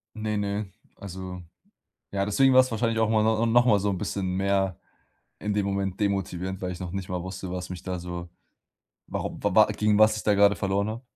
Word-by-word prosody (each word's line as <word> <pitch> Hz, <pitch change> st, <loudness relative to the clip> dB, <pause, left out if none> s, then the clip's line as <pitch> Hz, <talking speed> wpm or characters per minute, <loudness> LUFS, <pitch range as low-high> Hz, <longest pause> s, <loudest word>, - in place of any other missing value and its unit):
Ne, 110 Hz, -1 st, -2 dB
ne, 100 Hz, +1 st, -2 dB, 0.3 s
also, 95 Hz, -1 st, -7 dB, 0.7 s
ja, 100 Hz, 0 st, 0 dB
deswegen 130 Hz, +6 st, +4 dB
war's 130 Hz, 0 st, +6 dB
wahrscheinlich 115 Hz, 0 st, 0 dB
auch 110 Hz, -1 st, +2 dB
mal 110 Hz, -1 st, +3 dB
no 110 Hz, +1 st, +2 dB
noch 120 Hz, +1 st, +4 dB
mal 105 Hz, -5 st, +4 dB
so 100 Hz, +1 st, 0 dB
'n 95 Hz, -, -1 dB
bisschen 95 Hz, 0 st, -2 dB
mehr 95 Hz, -1 st, +1 dB, 0.6 s
in 105 Hz, 0 st, -2 dB
dem 100 Hz, -1 st, 0 dB
Moment 100 Hz, -1 st, -2 dB
demotivierend, 95 Hz, -2 st, -2 dB
weil 90 Hz, -1 st, -2 dB
ich 90 Hz, -, -7 dB
noch 90 Hz, -, -5 dB
nicht 95 Hz, -1 st, -4 dB
mal 90 Hz, -1 st, -2 dB
wusste, 95 Hz, 0 st, -6 dB
was 90 Hz, 0 st, -5 dB
mich 90 Hz, -1 st, -7 dB
da 90 Hz, -1 st, -3 dB
so 85 Hz, 0 st, -6 dB, 0.8 s
warum, -, -, -5 dB
wa -, -, +1 dB
wa -, -, +7 dB
gegen 105 Hz, -1 st, +1 dB
was 110 Hz, 0 st, +5 dB
ich 105 Hz, -, -4 dB
da 105 Hz, -, +3 dB
grade 100 Hz, -1 st, +5 dB
verloren 100 Hz, +3 st, 0 dB
habe. 115 Hz, +3 st, -5 dB
100 Hz, 215 wpm, -26 LUFS, 95-110 Hz, 0.8 s, wa